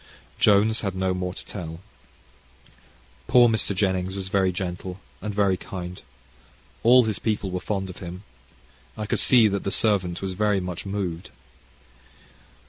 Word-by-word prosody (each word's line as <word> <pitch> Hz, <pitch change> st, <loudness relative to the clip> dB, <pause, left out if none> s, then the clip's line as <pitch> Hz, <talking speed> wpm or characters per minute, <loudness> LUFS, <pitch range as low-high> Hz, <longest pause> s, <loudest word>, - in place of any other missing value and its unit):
Jones 105 Hz, +2 st, +4 dB
had 100 Hz, -3 st, -3 dB
no 95 Hz, 0 st, 0 dB
more 90 Hz, 0 st, -3 dB
to -, -, -9 dB
tell. 80 Hz, -4 st, -7 dB, 1.5 s
Poor 125 Hz, -1 st, +6 dB
Mr. 110 Hz, -3 st, 0 dB
Jennings 95 Hz, -1 st, 0 dB
was 95 Hz, -1 st, -5 dB
very 95 Hz, -1 st, +2 dB
gentle, 90 Hz, 0 st, -5 dB, 0.2 s
and 105 Hz, -, -3 dB
very 100 Hz, -2 st, +2 dB
kind. 90 Hz, -2 st, -7 dB, 0.8 s
All 125 Hz, +2 st, +7 dB
his 110 Hz, -4 st, -2 dB
people 105 Hz, -4 st, -1 dB
were 90 Hz, -, -2 dB
fond 95 Hz, 0 st, -3 dB
of 90 Hz, -, -9 dB
him. 90 Hz, +2 st, -8 dB, 0.7 s
I 110 Hz, -, -3 dB
could -, -, -1 dB
see 120 Hz, -4 st, +6 dB
that 100 Hz, 0 st, -2 dB
the -, -, -1 dB
servant 95 Hz, -5 st, +1 dB
was 95 Hz, -1 st, -4 dB
very 105 Hz, +1 st, +1 dB
much 90 Hz, +1 st, -5 dB
moved. 95 Hz, -4 st, -3 dB
95 Hz, 150 wpm, -25 LUFS, 90-105 Hz, 1.5 s, All